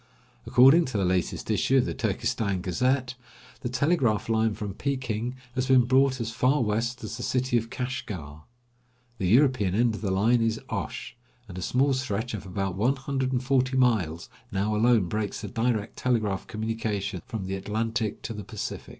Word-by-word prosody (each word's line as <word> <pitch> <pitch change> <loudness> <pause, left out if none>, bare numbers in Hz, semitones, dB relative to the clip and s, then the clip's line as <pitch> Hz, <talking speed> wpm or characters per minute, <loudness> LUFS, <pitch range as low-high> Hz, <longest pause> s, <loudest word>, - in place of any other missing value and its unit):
According 130 +8 +6
to 130 -5 -3
the 95 - +1
latest 90 -1 -1
issue 135 - +2
of 125 - +4
the - - -2
Turkestan 100 -4 -1
'Gazette,' 125 +7 0 0.5
the 120 - -3
telegraph 130 -5 +1
line 110 -1 +2
from 105 -2 -5
Peking 125 -1 -2 0.2
has 130 0 -1
been 130 -2 +6
brought 130 +1 +3
as 115 -1 -3
far 125 +3 +2
west 115 +3 -1
as 110 +1 -5
the - - -6
city 125 0 0
of 115 -1 +1
Kashgar. 95 - -5 0.8
The 95 - 0
European 115 -4 +3
end 115 +1 +3
of 110 - -6
the 100 - -1
line 110 +6 +3
is 115 0 +1
at - - -12
Osh, - - -4 0.3
and 90 - -10
a 90 - -5
small 135 +8 +2
stretch 120 -3 -2
of 100 -2 -6
about 95 0 -2
140 130 +1 0
miles 100 -11 +1 0.2
now 105 +2 0
alone 110 -3 +3
breaks 105 +2 -3
the - - -5
direct 115 -3 -1
telegraph 110 -6 0
communication 110 -4 -3
from 110 -4 -4
the 95 - -3
Atlantic 110 +3 -2
to 115 - -4
the 105 -1 -6
Pacific." 100 +2 -6
115 Hz, 175 wpm, -27 LUFS, 105-130 Hz, 0.8 s, According